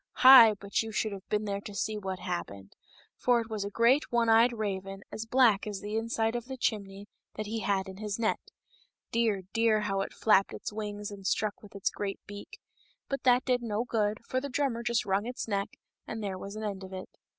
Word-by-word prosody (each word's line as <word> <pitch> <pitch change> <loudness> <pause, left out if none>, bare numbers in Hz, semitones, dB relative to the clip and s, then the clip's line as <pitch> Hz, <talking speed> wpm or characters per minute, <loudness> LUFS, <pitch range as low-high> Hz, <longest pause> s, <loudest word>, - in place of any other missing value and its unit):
" - - -63
Hi 235 -5 +10
!" - - -30
but 200 0 -1
you 225 0 -5
should 215 0 -1
have 195 -1 -9
been 210 0 0
there 200 -1 -2
to 205 0 -9
see 215 +2 -1
what 190 -3 -4
happened; 100 - -6 0.4
for 245 -1 +3
it 225 -1 -6
was 215 -2 -2
a 200 - -3
great 235 +7 +3
one 235 -1 +2
eyed 230 +2 +6
raven, 195 -3 -4
as 220 +1 -6
black 230 -5 +4
as 205 -2 -4
the 205 +2 -5
inside 225 0 0
of 240 -1 -3
the 265 0 -7
chimney, 200 -4 -2 0.3
that 215 - -4
he 225 +2 -3
had 195 -1 0
in 190 0 -9
his 210 -1 -3
net. 225 -1 0 0.7
Dear, 225 -4 +1
dear, 225 -2 +3
how 195 -2 -1
it - - -4
flapped 205 -3 +3
its - - -6
wings 210 -1 -5
and 195 -1 -6
struck 215 -1 -1
with 205 -1 -15
its 200 - -1
great 200 -1 -4
beak! 205 0 -10 0.5
But 275 - -2
that 250 +1 +4
did 250 -2 +1
no 225 -1 -1
good, 215 -2 -1
for 255 - -1
the 280 - -5
drummer 255 -3 -1
just 235 -1 0
wrung 200 +3 0
its 250 -1 -5
neck, 200 -2 -2 0.3
and 220 -1 -5
there 190 -2 -3
was 200 +2 -7
an 215 - -5
end 200 -2 -4
of 190 0 -9
it. 185 0 -6
215 Hz, 230 wpm, -29 LUFS, 200-230 Hz, 0.7 s, Hi